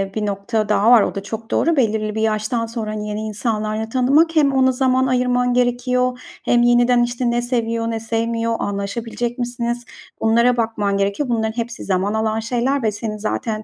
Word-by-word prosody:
bir 215 -1 -1
nokta 210 +2 -2
daha 210 +2 +4
var, 240 -3 +8
o - - -1
da 195 - -4
çok 225 +2 -7
doğru. 335 0 +2
Belirli 215 -3 0
bir 220 - -1
yaştan 220 +2 0
sonra, 225 -2 -4
hani, 210 0 -4
yeni 210 +1 -3
insanlarla 215 0 -2
tanımak. 280 +7 +3
Hem 285 -3 +4
ona 260 -1 +4
zaman 260 0 +2
ayırman 250 -1 +1
gerekiyor 250 +1 +1 0.3
hem 240 0 +3
yeniden, 240 0 +4
işte, 240 0 -1
ne 240 0 0
seviyor, 230 -2 -1
ne 225 - -2
sevmiyor, 230 0 -1
anlaşabilecek 230 +4 -3
misiniz, 240 0 -3 0.4
bunlara 235 +2 +3
bakman 210 -3 0
gerekiyor. 200 +8 -1
Bunların 220 -1 -1
hepsi 235 0 -4
zaman 195 +1 0
alan 220 0 0
şeyler 245 +4 -1
ve 215 - +2
senin 215 +1 -5
zaten 215 +1 -3
230 Hz, 180 wpm, -20 LUFS, 215-245 Hz, 0.4 s, var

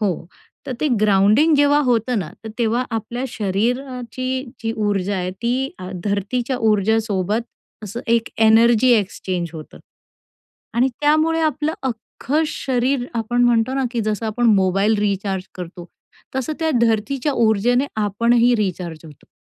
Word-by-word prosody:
हो. 185 -5 -1 0.4
तर 265 - -3
ते - - +1
ग्राउंडिंग 215 +9 +4
जेव्हा 290 +1 +4
होतं 240 -1 +1
ना, 155 -4 -6
तर - - -5
तेव्हा 235 +2 +1
आपल्या 225 +3 -3
शरीराची 250 +5 -2 0.2
जी 225 - -1
ऊर्जा 200 -1 0
आहे 180 0 -2
ती 255 +3 0
अ, 185 0 -7
धरतीच्या 215 +6 -1
ऊर्जासोबत 210 0 +1 0.4
असं 210 +4 -6
एक 230 0 +2 0.2
एनर्जी 230 +2 +5
एक्सचेंज 185 -4 -2
होतं 155 -2 -10 1.0
आणि 245 +3 +3
त्यामुळे 310 +2 +3
आपलं 305 0 0
अख्खं 265 +4 -2
शरीर 255 -2 -1
आपण 235 +2 0
म्हणतो 240 +1 +2
ना, 270 -1 0
की 240 - -1
जसं 215 +1 -2
आपण 235 +3 0
मोबाईल 195 +2 +2
रिचार्ज 195 -2 -1
करतो 175 -1 -8 0.5
तसं 265 +3 -2
त्या 320 0 +1
धर्तीच्या 235 +5 +1
ऊर्जेने 235 +3 +2
आपणही 235 +4 +3
रिचार्ज 180 -5 -3
होतो. 150 -3 -15
225 Hz, 135 wpm, -20 LUFS, 200-255 Hz, 1.0 s, एनर्जी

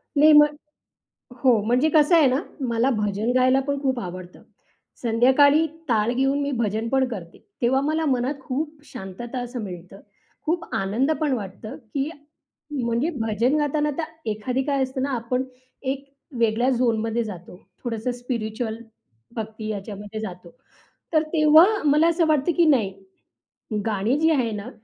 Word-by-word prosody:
नाही, 305 +2 +7
मग 295 0 +6 0.9
हो, 240 -5 +5
म्हणजे 250 +8 +2
कसं 310 +2 +5
आहे 305 -5 +6
ना, 255 +2 +2 0.3
मला 235 +2 +1
भजन 210 0 -1
गायला 255 +1 +4
पण 280 0 -1
खूप 260 -3 0
आवडतं. 180 -1 -8 0.6
संध्याकाळी 265 +7 +4 0.2
टाळ 225 0 +2
घेऊन 270 +3 +1
मी 285 0 -1
भजनपण 230 +2 0
करते, 185 -8 -8 0.2
तेव्हा 265 +3 +3
मला 310 +2 0
मनात 265 +1 0
खूप 295 +4 -4
शांतता 235 +6 -7
असं 245 -1 -5
मिळतं. 185 0 -9 0.5
खूप 335 +2 0
आनंद 220 +10 0
पण 300 -3 0
वाटतं 215 +2 -6 0.2
की 280 +2 -1 0.6
म्हणजे 245 +2 0
भजन 225 +5 +1
गाताना 295 0 0
तर 335 - -1 0.3
एखादी 245 +5 -2
काय 275 -1 0
असतं 260 0 -4
ना, 280 - -1
आपण 250 +2 -1 0.4
एक 275 +1 -3 0.3
वेगळ्या 230 +2 +2
झोनमध्ये 235 -2 +1
जातो. 180 -4 -9 0.3
थोडंसं 235 +1 -2
स्पिरिच्युअल, 230 -2 -4 0.6
भक्ती 220 -1 -5
याच्यामध्ये 205 +1 -6
जातो. 180 -4 -8 0.6
तर 310 - +4
तेव्हा 310 +1 +7 0.2
मला 300 +3 +4
असं 335 0 +2
वाटतं 310 +1 +2
की 345 - +5
नाही 235 -10 +3 0.9
गाणी 215 +4 +1
जी 320 0 +4
आहे 255 -7 +1
ना, 210 +3 -5
250 Hz, 145 wpm, -24 LUFS, 220-285 Hz, 0.9 s, नाही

